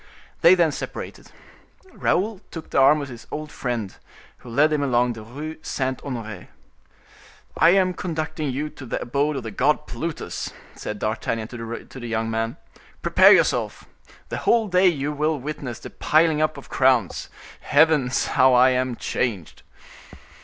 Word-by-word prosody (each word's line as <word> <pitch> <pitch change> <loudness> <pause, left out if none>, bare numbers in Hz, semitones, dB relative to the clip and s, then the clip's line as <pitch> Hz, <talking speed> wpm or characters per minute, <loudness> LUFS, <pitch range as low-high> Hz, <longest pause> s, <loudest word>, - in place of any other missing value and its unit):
They 175 +2 +8
then 170 -3 +3
separated. - - -7 0.6
Raoul 205 +1 0
took 165 -2 -9
the - - +2
arm 145 +2 +5
of 140 - -7
his 120 -2 -11
old 155 0 -6
friend, 120 -6 -4 0.4
who 125 - -12
led 150 +6 +3
him 150 - +1
along 125 -3 +2
the 115 - -9
Rue 145 +8 -7
Saint 130 -4 -3
Honore. 110 -8 -6 1.1
"I 165 - +5
an 185 -1 +2
conducting 155 -4 -3
you 145 +4 -3
to 135 -3 -11
the - - -2
abode 145 +4 -1
of 135 - -4
the 110 - -6
god 150 +7 +1
Plutus," 165 -1 -5 0.2
said 105 - -6
D'Artagnan 110 +1 -2
to 115 +2 -7
the 120 - -6
young 115 0 -2
man; 115 +4 -2 0.5
"prepare - - +6
yourself. - - +2 0.4
The - - -3
whole 230 -2 +2
day 185 +1 +4
you 150 -4 0
will 150 +1 0
witness 130 -4 -5
the - - -10
piling 155 0 +2
up 155 -1 0
of 140 - -11
crowns. 130 -7 +1 0.3
Heavens! 145 -5 +3
how 130 0 +4
I 130 +1 +6
am 130 -1 0
changed!" 105 -8 -3
135 Hz, 160 wpm, -23 LUFS, 120-155 Hz, 1.1 s, They